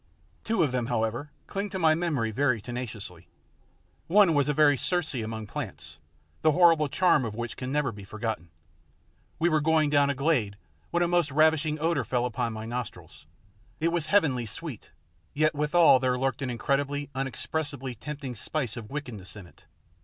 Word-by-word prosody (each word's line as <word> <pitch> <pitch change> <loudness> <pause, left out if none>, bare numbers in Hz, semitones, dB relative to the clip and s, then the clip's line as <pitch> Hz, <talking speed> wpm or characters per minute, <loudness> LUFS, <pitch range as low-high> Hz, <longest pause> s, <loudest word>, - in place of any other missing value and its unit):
Two 220 -6 +1
of 145 - +1
them, 125 -2 -1
however, 120 +3 -1 0.2
cling 200 +1 -4
to 195 - -4
my 160 -3 +4
memory 155 -9 -1
very 130 0 +1
tenaciously. 110 - -7 0.8
One 195 -1 +5
was 145 -1 +2
a - - +4
very 150 -1 +5
Circe 175 +4 +1
amongst 110 -3 -5
plants, 75 +2 -6 0.4
the 155 - +4
horrible 165 -4 +5
charm 175 -6 +3
of 110 -3 -4
which 120 0 -4
can 130 0 -5
never 150 -1 0
be 100 -2 -10
forgotten. 110 -3 -4 0.9
We 170 - +2
were 155 -3 +2
going 155 -1 +2
down 145 -1 +4
a 140 - 0
glade 130 -8 0 0.3
when 175 0 +1
a - - +2
most 175 -3 +2
ravishing 155 +1 +3
odour 160 -3 +1
fell 125 +2 0
upon 120 -1 -2
my 110 0 -6
nostrils. 120 -9 -7 0.5
It 165 - +2
was 170 -2 -1
heavenly 145 - +2
sweet 125 +1 -7 0.5
yet 155 +2 +3
withal 150 -1 +5
there 125 0 +1
lurked 135 0 -1
an 130 - -2
incredibly, 140 +4 -1
unexpressibly 135 0 -3
tempting 140 +2 -6
spice 125 +2 -3
of 115 -3 -8
wickedness 120 -11 -6
in 100 -3 -10
it. 90 - -21
140 Hz, 175 wpm, -27 LUFS, 115-155 Hz, 0.9 s, One